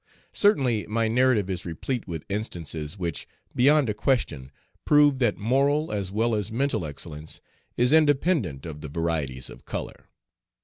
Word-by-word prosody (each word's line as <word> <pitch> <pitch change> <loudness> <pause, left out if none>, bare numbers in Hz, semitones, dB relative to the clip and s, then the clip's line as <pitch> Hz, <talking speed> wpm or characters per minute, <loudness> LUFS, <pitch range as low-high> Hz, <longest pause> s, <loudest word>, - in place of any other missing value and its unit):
Certainly, 135 - +2
my 115 +1 +1
narrative 120 -3 +3
is 90 -2 -3
replete 110 +9 -4
with 80 -4 -6
instances 85 -5 -4
which, 85 -4 -4 0.3
beyond 145 +2 +4
a 105 - 0
question, 80 - -1 0.3
prove 145 -2 +4
that 120 -5 +2
moral 140 +7 +1
as 100 -3 -3
well 115 +3 +1
as 105 -1 -2
mental 120 - 0
excellence 75 +1 -8 0.4
is 125 +4 +3
independent 145 - +2
of 75 -3 -7
the 75 - -6
varieties 75 -5 -2
of - - -11
color. - - -7
105 Hz, 145 wpm, -26 LUFS, 85-130 Hz, 0.4 s, beyond